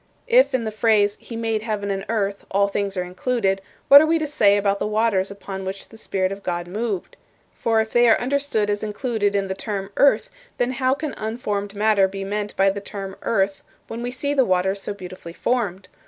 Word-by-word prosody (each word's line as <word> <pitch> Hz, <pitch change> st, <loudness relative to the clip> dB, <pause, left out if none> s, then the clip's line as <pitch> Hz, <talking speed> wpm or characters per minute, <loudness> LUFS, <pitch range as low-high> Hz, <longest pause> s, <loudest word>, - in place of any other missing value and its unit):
If -, -, +4 dB
in 245 Hz, -, 0 dB
the 220 Hz, -, -3 dB
phrase 210 Hz, -2 st, +3 dB
'He 235 Hz, -, -9 dB
made 225 Hz, -1 st, -1 dB
heaven 210 Hz, -2 st, -2 dB
and 195 Hz, 0 st, -3 dB
earth' 200 Hz, -3 st, -1 dB
all 200 Hz, +1 st, +2 dB
things 200 Hz, -1 st, -2 dB
are 180 Hz, -, 0 dB
included, 195 Hz, +1 st, -1 dB, 0.3 s
what 280 Hz, +1 st, +10 dB
are 315 Hz, -, +2 dB
we 330 Hz, +1 st, +3 dB
to 315 Hz, -, -1 dB
say 215 Hz, -9 st, +3 dB
about 200 Hz, 0 st, +1 dB
the -, -, -1 dB
waters 210 Hz, -3 st, +1 dB
upon 200 Hz, -1 st, -7 dB
which 190 Hz, +1 st, -6 dB
the -, -, -14 dB
Spirit 190 Hz, -3 st, -1 dB
of 195 Hz, 0 st, -6 dB
God 175 Hz, -2 st, -3 dB
moved? 205 Hz, 0 st, -4 dB, 0.4 s
For 225 Hz, -1 st, +1 dB
if 220 Hz, -, -4 dB
they 240 Hz, 0 st, +5 dB
are 225 Hz, -, +5 dB
understood 265 Hz, -4 st, 0 dB
as 205 Hz, -, -2 dB
included 215 Hz, -1 st, -1 dB
in 200 Hz, -1 st, 0 dB
the 190 Hz, -, -2 dB
term 195 Hz, 0 st, -4 dB
'earth,' 280 Hz, -, +4 dB, 0.3 s
then 245 Hz, +1 st, +1 dB
how 260 Hz, +1 st, +1 dB
can 300 Hz, 0 st, -4 dB
unformed 210 Hz, -2 st, -3 dB
matter 205 Hz, -2 st, +3 dB
be 195 Hz, +1 st, -6 dB
meant 205 Hz, +1 st, -3 dB
by 195 Hz, 0 st, +4 dB
the 200 Hz, +1 st, -5 dB
term 195 Hz, -1 st, -7 dB
'earth' 195 Hz, -3 st, 0 dB, 0.3 s
when 230 Hz, +1 st, -6 dB
we 245 Hz, -, -2 dB
see 285 Hz, +3 st, -2 dB
the 270 Hz, -2 st, +4 dB
waters 190 Hz, -1 st, +1 dB
so 205 Hz, -, -4 dB
beautifully 180 Hz, -3 st, -9 dB
formed? 200 Hz, -5 st, -1 dB
205 Hz, 215 wpm, -22 LUFS, 195-230 Hz, 0.4 s, what